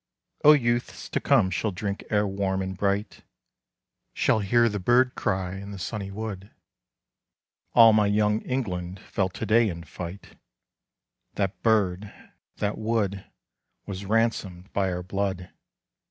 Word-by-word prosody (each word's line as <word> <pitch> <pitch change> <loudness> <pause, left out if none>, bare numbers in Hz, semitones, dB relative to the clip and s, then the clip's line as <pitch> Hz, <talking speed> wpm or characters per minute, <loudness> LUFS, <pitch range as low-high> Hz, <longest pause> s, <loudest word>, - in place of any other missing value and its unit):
O 150 - +9
youths 120 -4 -1
to - - -1
come 95 - +3
shall 110 - -1
drink 100 +1 -4
air 105 -1 +2
warm 95 -1 -1
and 95 0 -4
bright, 100 +2 -1 0.9
Shall - - +2
hear 115 +4 +3
the 105 -2 -2
bird 125 +6 +3
cry 95 -1 -2
in 100 +1 -8
the 100 - -7
sunny 100 +2 -4
wood, 100 -1 -6 1.3
All 115 -2 +8
my 105 -1 +4
Young 105 +1 +2
England 95 -8 -3
fell 95 -2 -2
to - - -5
day 115 0 +4
in 85 -2 -6
fight: 85 +4 -9 1.0
That 100 0 -2
bird, 105 -3 +1 0.4
that 105 +1 -2
wood, 105 -3 -1 0.6
was 95 0 -6
ransomed 100 -3 -1
by 95 -2 +1
our 90 0 -3
blood! 95 -1 -3
100 Hz, 140 wpm, -26 LUFS, 95-110 Hz, 1.3 s, O